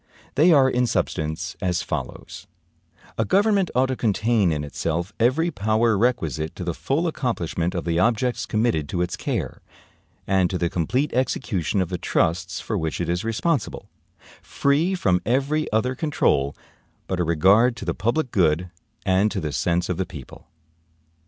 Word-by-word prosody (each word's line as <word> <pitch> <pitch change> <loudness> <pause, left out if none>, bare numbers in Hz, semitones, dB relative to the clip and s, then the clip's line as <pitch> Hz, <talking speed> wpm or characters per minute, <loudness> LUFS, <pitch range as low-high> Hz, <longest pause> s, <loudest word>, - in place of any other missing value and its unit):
They 160 +5 +5
are 140 -4 +6
in 125 -1 +1
substance 80 -4 -2
as 90 -2 0
follows: - - -6 0.7
A - - +4
government 200 -1 +2
ought 130 +1 +4
to 130 - -1
contain 110 -4 +1
in 75 -2 -2
itself 85 +5 -3
every 140 +9 +2
power 110 -1 +1
requisite 80 - 0
to 90 - -6
the 85 -1 -2
full 140 - -1
accomplishment 90 - -2
of 90 - -3
the 85 0 0
objects 120 +5 +1
committed 105 -10 0
to 90 -1 0
its 90 - -3
care, - - -3 0.6
and 95 -2 +2
to 90 - -2
the 85 -1 -1
complete 125 - 0
execution 110 -7 0
of 85 - -7
the 90 -2 -3
trusts 85 +3 0
for 105 -3 -3
which 80 -1 -3
it 85 -1 -2
is 85 +3 -1
responsible, 130 +8 -2 0.5
free 155 +7 +1
from 90 - +1
every 140 +6 0
other 110 +4 +1
control 120 - +1 0.5
but 95 - -3
a - - +2
regard 95 +9 +4
to 110 - -8
the 85 - 0
public 120 - -1
good 85 -1 +1 0.3
and 95 +2 +3
to - - -3
the 75 -2 -3
sense 85 +3 0
of 90 - -2
the 95 - -1
people. 70 -8 -11
100 Hz, 165 wpm, -23 LUFS, 85-125 Hz, 0.7 s, are